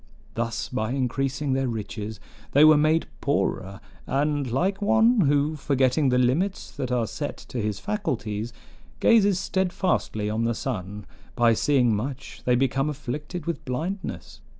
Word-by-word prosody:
Thus 115 0 -2
by 120 -1 -2
increasing 135 +1 -1
their 135 0 +1
riches 110 -2 -5 0.3
they 145 +2 +7
were 155 0 +8
made 155 +2 +3 0.2
poorer; 95 +1 -1 0.3
and, 145 -2 0
like 190 - 0
one 225 +2 +4
who, 145 +2 +2
forgetting 135 -1 +2
the 125 - +2
limits 150 +11 +1
that 130 -2 -4
are 120 -2 +1
set 145 +6 -5
to 125 - -4
his 105 -2 -2
faculties, 120 - -3 0.5
gazes 205 -5 +5
steadfastly 185 - 0
on 110 +2 -1
the 115 0 0
sun, 105 -5 -4 0.3
by 120 -2 +4
seeing 125 -2 +3
much 135 +5 -5
they 125 - +4
become 135 +3 +1
afflicted 150 +4 -5
with 170 - -3
blindness. 165 +10 -5
135 Hz, 145 wpm, -25 LUFS, 115-155 Hz, 0.5 s, were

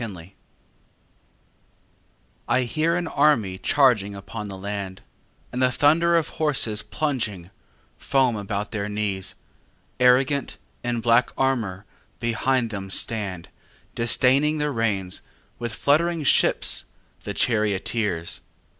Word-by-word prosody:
XXXVI 95 -6 -7 2.2
I 130 - +2
hear 155 +7 0
an 175 -1 -2
army 120 -13 +2
charging 110 -9 +2
upon 105 +2 -7
the 100 -1 -7
land, 100 -1 -5 0.5
And 125 - -2
the 130 - +4
thunder 165 +6 +3
of 165 -2 +1
horses 135 -9 +1
plunging, 110 - -3 0.5
foam 130 -4 +2
about 105 0 -4
their 105 -2 -3
knees: 100 -2 -3 0.6
Arrogant, 130 +2 +3 0.3
in 120 -1 -1
black 115 +1 +3
armour, 110 -8 -1 0.3
behind 120 +1 0
them 95 -2 -6
stand, 95 -4 0 0.4
Disdaining 130 +6 +3
the 150 0 -1
reins, 100 -6 -1 0.4
with 120 -1 -4
fluttering 155 +6 +1
whips, - - +3 0.4
the - - -5
charioteers. 105 -5 0
115 Hz, 110 wpm, -24 LUFS, 100-135 Hz, 2.2 s, the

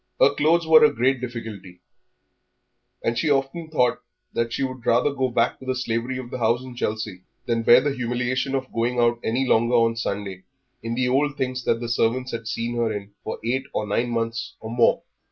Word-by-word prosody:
Her - - +5
clothes 165 +3 +2
were 160 0 +8
her 150 - +6
great 130 +2 +1
difficulty, 110 -7 -7 1.2
and 115 - 0
she 155 - +1
often 140 +4 0
thought 125 -6 +1 0.3
that 115 0 -1
she 140 - -2
would 130 -2 -4
rather 125 +4 +2
go 130 -2 0
back 120 0 +1
to 130 - -11
the 130 0 -1
slavery 125 0 -2
of 125 -2 -7
the - - -4
house 120 +2 +1
in 130 -1 -10
Chelsea 110 -5 -3 0.2
than 115 -1 0
bear 120 +2 +7
the 145 +1 0
humiliation 125 +2 -1
of 130 -1 -4
going 120 +2 0
out 120 0 +2
any 125 +4 0
longer 120 0 +3
on 115 -1 +3
Sunday 100 -4 -4 0.4
in 115 +1 -3
the 125 0 +1
old 145 +3 +1
things 130 -1 -2
that 115 - +1
the 120 - -3
servants 120 +2 0
had 115 -1 -5
seen 115 +1 -3
her 115 -2 +1
in 105 -1 -6
for - - -4
eight 130 +3 0
or 105 - -1
nine 115 +4 0
months 115 0 -3
or 110 - -7
more. 120 0 +3
120 Hz, 210 wpm, -24 LUFS, 115-130 Hz, 1.2 s, were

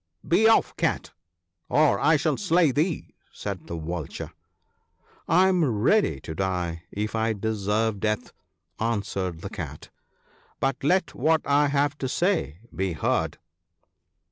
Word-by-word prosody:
" - - -21
Be 220 - +5
off, 225 - +4
Cat, - - -1 0.6
or 150 -1 +4
I 155 +2 +4
shall 155 -1 +1
slay 175 -6 +3
thee," 155 +5 -1 0.2
said 95 -6 -6
the 85 - -4
Vulture. 80 -1 -5 0.6
" - - -34
I 180 +4 +5
am 180 -3 +3
ready 135 - +2
to 80 - -6
die 90 -2 -2
if 105 +2 -3
I 110 0 +1
deserve 105 0 -1
death," 105 +1 -2 0.5
answered 100 -6 -2
the - - -6
Cat; - - -7 0.4
" - - -34
but 135 0 -1
let 180 +4 +2
what 160 +4 +2
I 145 +1 +3
have 145 +1 0
to 130 - -2
say 160 - 0
be 95 -2 -1
heard." 80 - 0
115 Hz, 145 wpm, -26 LUFS, 95-155 Hz, 0.6 s, Be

